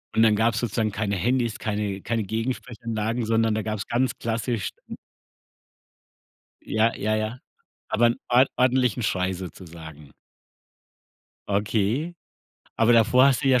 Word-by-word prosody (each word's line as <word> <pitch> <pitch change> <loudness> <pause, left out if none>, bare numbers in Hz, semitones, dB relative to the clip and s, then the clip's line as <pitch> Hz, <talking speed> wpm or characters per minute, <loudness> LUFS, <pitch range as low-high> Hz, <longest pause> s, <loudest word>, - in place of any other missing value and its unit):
Und 110 - +5
dann 110 -2 +5
gab's 110 +1 +1
sozusagen 110 -2 -1
keine 105 0 -2
Handys, 120 +4 0
keine 105 -2 -3
keine 115 +2 -1
Gegensprechanlagen, 115 +1 -3
sondern 115 0 +2
da 110 - -1
gab's 105 -2 -4
ganz 125 +1 +1
klassisch 115 -1 -2 0.2
n - - -6 1.7
Ja, 110 +1 +1
ja, 110 +1 0
ja, 110 +3 -3 0.5
aber 120 +2 +3
'n 120 - +1
ord 125 +2 +5
ordentlichen 125 -2 +2
Schrei 95 -1 0
sozusagen. 80 -5 -10 1.4
Okay. 105 - 0 0.6
Aber 115 +1 +4
davor 120 +3 +5
hast 140 0 +2
du - - +3
ja 130 -2 +5
110 Hz, 130 wpm, -24 LUFS, 105-120 Hz, 1.7 s, Und